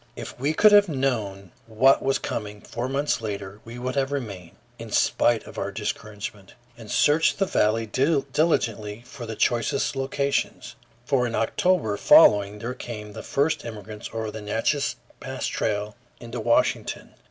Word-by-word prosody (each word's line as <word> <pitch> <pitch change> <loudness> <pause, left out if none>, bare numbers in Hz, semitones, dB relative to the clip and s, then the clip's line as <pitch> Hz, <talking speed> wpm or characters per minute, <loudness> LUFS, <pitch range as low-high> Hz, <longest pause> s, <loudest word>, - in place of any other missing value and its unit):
If - - -8
we 145 +4 0
could 215 +4 +6
have 205 -2 +6
known 110 - -2 0.2
what 125 +5 +4
was 135 0 +1
coming 105 -1 -5
four 120 +3 -5
months 140 -2 0
later, 100 -2 -5
we 115 +1 -9
would 125 +1 -3
have 135 0 0
remained, 100 -11 -5 0.2
in - - -8
spite 120 -2 +2
of - - -8
our - - -2
discouragement, 105 -2 -6 0.2
and 115 -2 -12
searched 150 +2 +3
the 195 - +2
valley 115 - +1
diligently 130 -5 0
for 120 -2 -9
the 110 - -5
choicest 120 +5 0
locations. 140 +1 -2 0.3
For 125 -2 +2
in 115 - -3
October 115 - +1
following 100 0 +6
there 115 +4 -4
came 105 -4 -8
the - - -7
first 145 +4 0
immigrants 110 -1 -8
over 110 -1 -4
the 110 - -7
Natchess 115 +7 0 0.2
Pass - - -5
Trail 105 0 -2 0.2
into 120 0 -7
Washington. 115 +1 0
115 Hz, 155 wpm, -25 LUFS, 105-135 Hz, 0.3 s, could